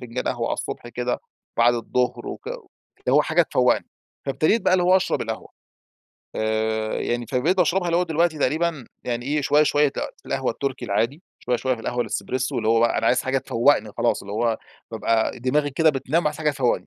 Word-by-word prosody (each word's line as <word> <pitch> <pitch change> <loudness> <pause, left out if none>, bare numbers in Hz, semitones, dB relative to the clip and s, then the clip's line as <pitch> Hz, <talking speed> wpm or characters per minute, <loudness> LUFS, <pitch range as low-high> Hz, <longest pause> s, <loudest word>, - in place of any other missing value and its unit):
فنجان 125 +1 -5
قهوة 115 -1 -1
على - - -1
الصبح 120 - -6
كده، 125 +1 -2 0.4
بعد 120 +1 +5
الظهر 125 +2 -1
وك - - -7
اللي - - -5 0.5
هو 145 +3 +5
حاجة 160 +3 +3
تفوّقني، 125 -5 +2 0.4
فابتديت 155 +11 +2
بقى - - +2
اللي 185 -1 +4
هو 185 +1 +6
أشرب 190 - 0
القهوة. - - -5 0.9
آآ، 110 0 0
يعني 120 0 -2
فبقيت 150 - +1
باشربها 180 +1 +2
اللي 170 0 +1
هو 180 - +3
دلوقتي 165 -1 +1
تقريبًا 155 -2 0 0.2
يعني 120 0 -2
إيه، 150 +2 +1
شوية، 150 +1 +4
شوية 145 0 +3
ت - - -8 0.3
القهوة - - -1
التركي 140 -2 -4
العادي 120 - -1 0.2
شوية، 125 0 0
شوية 130 +1 0
في 115 - -10
القهوة 125 +2 -2
الاسبريسو 120 +3 -2
اللي 110 - -1
هو 115 0 +4
بقى 115 - +3
أنا 115 - 0
عايز 125 - +3
حاجة 130 +1 +1
تفوّقني 120 -3 +2
خلاص، - - +1
اللي 100 - -8
هو 115 +1 0 0.3
بابقى 115 -1 0
دماغي 145 +4 +1
كده 160 +3 +4
بتنام 150 +4 0
عايز 150 0 -1
حاجة 155 -1 +2
تفوّقني، 130 -4 0
130 Hz, 200 wpm, -23 LUFS, 120-155 Hz, 0.9 s, هو